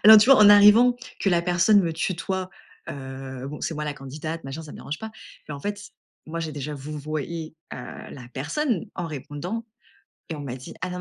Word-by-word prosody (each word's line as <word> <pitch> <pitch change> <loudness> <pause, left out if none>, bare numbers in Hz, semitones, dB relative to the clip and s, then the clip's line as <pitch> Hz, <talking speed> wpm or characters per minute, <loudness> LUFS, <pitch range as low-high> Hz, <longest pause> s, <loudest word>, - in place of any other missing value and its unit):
Alors 220 +1 +12
tu 220 +5 +4
vois? 270 - +10
En 205 - +9
arrivant, 210 +4 +8 0.2
que 195 - +2
la 175 -1 +4
personne 180 +4 +4
me 170 -3 0
tutoie, 185 +2 -2 0.4
heu, 130 -1 -6
bon, 150 +2 -6
c'est 165 - -2
moi 150 0 -3
la 150 - -2
candidate, 155 +4 -6
machin, 135 +4 -6
ça 150 - -10
me - - -9
dérange 150 +2 -5
pas, 220 0 -6 0.4
mais 145 - -4
en 140 - -8
fait, 205 +3 -3 0.5
moi, 165 +1 -4
j'ai 160 - -3
déjà 150 +1 -4
vouvoyé, 155 +3 -5 0.2
heu, - - -4 0.3
la 125 -3 -9
personne 215 - -1
en 175 -2 -2
répondant 155 - -5 0.7
et 160 - -3
on - - -7
m'a 130 -3 -5
dit: 130 - -9
«Ah 185 - -2
nan 180 - -5
160 Hz, 215 wpm, -25 LUFS, 145-190 Hz, 0.7 s, Alors